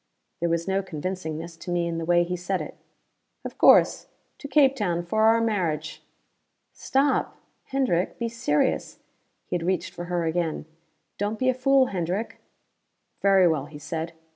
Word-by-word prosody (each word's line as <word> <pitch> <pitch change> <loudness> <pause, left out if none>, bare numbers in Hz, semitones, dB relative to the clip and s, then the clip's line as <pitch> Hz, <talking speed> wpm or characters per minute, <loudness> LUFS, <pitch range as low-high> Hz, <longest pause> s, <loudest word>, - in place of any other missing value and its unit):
There 170 - 0
was 170 +1 -1
no 195 0 +1
convincingness 165 -2 -5
to - - -8
me 175 -1 0
in 165 -1 -3
the 165 - -4
way 175 +1 +4
he 180 +1 -3
said 180 +2 -2
it. - - -7 0.7
"Of - - -7
course. - - +5 0.3
To 285 - -7
Cape 275 -1 +4
Town 175 -7 -1
for 215 +5 +2
our 225 +1 +5
marriage." 190 -9 -1 0.7
"Stop! 270 +1 0 0.3
Hendrick, 255 -10 0
be 235 - -2
serious!" 225 -10 0 0.5
He - - -3
had 175 - -1
reached 185 0 -1
for 175 - -6
her 175 -1 -1
again. 165 -1 -1 0.5
"Don't 205 +2 -1
be 255 +2 +1
a - - +3
fool, 265 +1 +3
Hendrick." 185 +5 -3 0.8
"Very 195 -2 +5
well," 155 -4 0
he 150 -1 -11
said. 160 +2 -5
180 Hz, 165 wpm, -25 LUFS, 170-220 Hz, 0.8 s, course